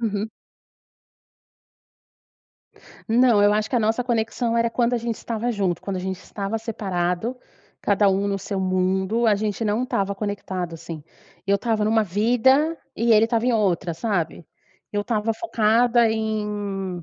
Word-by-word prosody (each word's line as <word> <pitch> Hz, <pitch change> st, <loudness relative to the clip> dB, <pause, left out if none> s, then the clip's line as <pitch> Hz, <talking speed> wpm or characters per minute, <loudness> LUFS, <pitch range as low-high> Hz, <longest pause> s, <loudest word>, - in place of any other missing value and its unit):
Uhum. 215 Hz, -1 st, -2 dB, 2.8 s
Não, 235 Hz, -2 st, +4 dB
eu 205 Hz, -, +5 dB
acho 215 Hz, +1 st, 0 dB
que 255 Hz, -, 0 dB
a -, -, +4 dB
nossa 220 Hz, +3 st, +1 dB
conexão 230 Hz, 0 st, -1 dB
era 230 Hz, 0 st, +2 dB
quando 240 Hz, +1 st, +1 dB
a -, -, +1 dB
gente 230 Hz, -1 st, -3 dB
estava 235 Hz, +1 st, -3 dB
junto, 190 Hz, -5 st, -1 dB
quando 195 Hz, -2 st, -3 dB
a -, -, -2 dB
gente 190 Hz, 0 st, -4 dB
estava 200 Hz, +2 st, -4 dB
separado, 200 Hz, 0 st, -2 dB, 0.5 s
cada 205 Hz, 0 st, +3 dB
um 195 Hz, +1 st, +1 dB
no 200 Hz, -1 st, -1 dB
seu 195 Hz, 0 st, -4 dB
mundo, 190 Hz, +4 st, +1 dB
a 215 Hz, -, +5 dB
gente 210 Hz, +2 st, -2 dB
não 215 Hz, +3 st, 0 dB
estava 200 Hz, -5 st, -1 dB
conectado, 195 Hz, -4 st, -4 dB
assim. 165 Hz, -2 st, -8 dB, 0.4 s
Eu 200 Hz, 0 st, +3 dB
estava 220 Hz, -1 st, 0 dB
numa 220 Hz, +1 st, +3 dB
vida 245 Hz, -, +3 dB, 0.2 s
e 230 Hz, 0 st, +3 dB
ele 215 Hz, +1 st, +6 dB
estava 230 Hz, 0 st, 0 dB
em 250 Hz, -, +2 dB
outra, 190 Hz, -5 st, +1 dB
sabe? 175 Hz, -3 st, -2 dB, 0.5 s
Eu 205 Hz, 0 st, -1 dB
estava 220 Hz, 0 st, 0 dB
focada 230 Hz, -3 st, +3 dB
em 205 Hz, -4 st, -3 dB
210 Hz, 155 wpm, -23 LUFS, 195-230 Hz, 2.8 s, ele